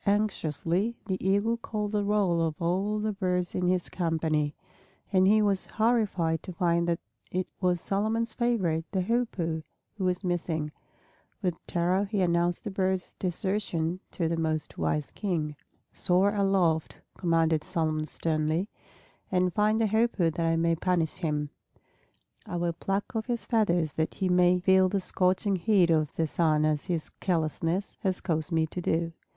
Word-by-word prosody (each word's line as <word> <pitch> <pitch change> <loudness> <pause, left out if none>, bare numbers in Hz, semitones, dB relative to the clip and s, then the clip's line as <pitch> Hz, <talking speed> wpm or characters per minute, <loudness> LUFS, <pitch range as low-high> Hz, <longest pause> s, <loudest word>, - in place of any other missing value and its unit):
Anxiously 200 0 0
the 190 -3 -3
Eagle 205 +5 +2
called 210 -2 -3
the 210 -1 +1
roll 200 -5 +2
of 160 -2 -1
all 190 +5 0
the 215 0 -1
birds 180 -3 -1
in 180 -1 0
his 180 -1 +1
company; 160 -4 0 0.6
and 185 0 +5
he 215 +1 +5
was 200 -2 +1
horrified 210 -8 +1
to - - -7
find 170 -1 +1
that 170 -1 +1 0.3
it 185 0 0
was 180 -2 +1
Solomon's 220 +5 0
favorite, 190 -10 +1
the 190 - 0
Hoopoe, 180 -8 -1 0.3
who 205 - -4
was 180 +1 0
missing. 165 -4 -1 0.7
With 180 -3 -2
terror 180 +3 +1
he 200 -1 -1
announced 175 -1 +1
the - - -4
bird's 190 -1 -1
desertion 185 -2 -1
to 170 - 0
the 165 0 -1
most 155 -2 -2
wise 150 -2 -1
King. 160 -7 -2 0.4
"Soar 190 +2 +2
aloft," 190 -6 +1 0.2
commanded 165 -3 +2
Solomon 155 -2 -1
sternly, 160 +4 -1 0.6
"and 180 -1 +2
find 215 +3 +2
the 225 - +3
Hoopoe 215 -5 +2
that 165 +1 -1
I 165 - +2
may 165 0 +2
punish 170 -2 0
him. 150 -4 -2 1.0
I - - -4
will 170 -1 0
pluck 195 +7 -3
off 220 +1 -2
his 240 -2 -2
feathers 175 -9 +2
that 160 +2 -2
he 190 -2 -1
may 180 0 +5
feel 190 +1 +4
the 200 - 0
scorching 185 +1 +1
heat 185 -2 +3
of 155 -3 +2
the 165 - +1
sun 155 -1 +2
as 155 -1 0
his 170 -4 -2
carelessness 165 +2 -1
has 190 -1 0
caused 160 -1 -1
me 160 -1 +2
to 180 +3 -6
do." 165 0 0
180 Hz, 160 wpm, -28 LUFS, 165-200 Hz, 1.0 s, and